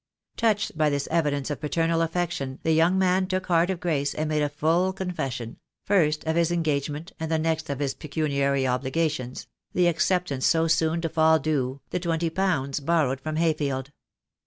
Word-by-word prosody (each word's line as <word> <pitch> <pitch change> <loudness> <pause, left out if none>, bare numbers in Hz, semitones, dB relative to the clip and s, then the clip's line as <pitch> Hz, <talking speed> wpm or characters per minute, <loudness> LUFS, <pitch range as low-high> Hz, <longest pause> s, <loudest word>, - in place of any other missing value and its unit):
Touched 215 -6 +1
by 155 -1 +2
this 140 -1 -1
evidence 150 -4 0
of 145 - -4
paternal 165 +2 +1
affection 165 -5 -2
the 160 - +2
young 165 +4 +3
man 185 0 +2
took 185 0 -2
heart 170 0 +2
of 190 -3 -2
grace 145 -5 -1
and 155 0 -1
made 155 -1 +1
a 145 - +1
full 165 +6 +1
confession 135 -11 -4
— - - -63
first 155 -7 +2
of 160 0 -1
his 170 0 +2
engage 155 -4 0
ment, 150 +3 -7
and 160 0 -3
next 160 -1 -1
of 140 - -2
his 140 -1 -1
pecuniary 140 -3 0
obligations 130 +1 -1
— - - -48
the 180 - +4
accept 175 +1 +1
ance 130 -1 0
so 165 0 +3
soon 165 0 +1
to 165 - -1
fall 160 0 +4
due, 140 -4 -1
the - - -1
twenty 165 -1 -1
pounds 155 -7 0
borrowed 140 -3 +1
from 155 +2 -4
Hayfield. 150 -4 0
160 Hz, 190 wpm, -25 LUFS, 140-170 Hz, -, the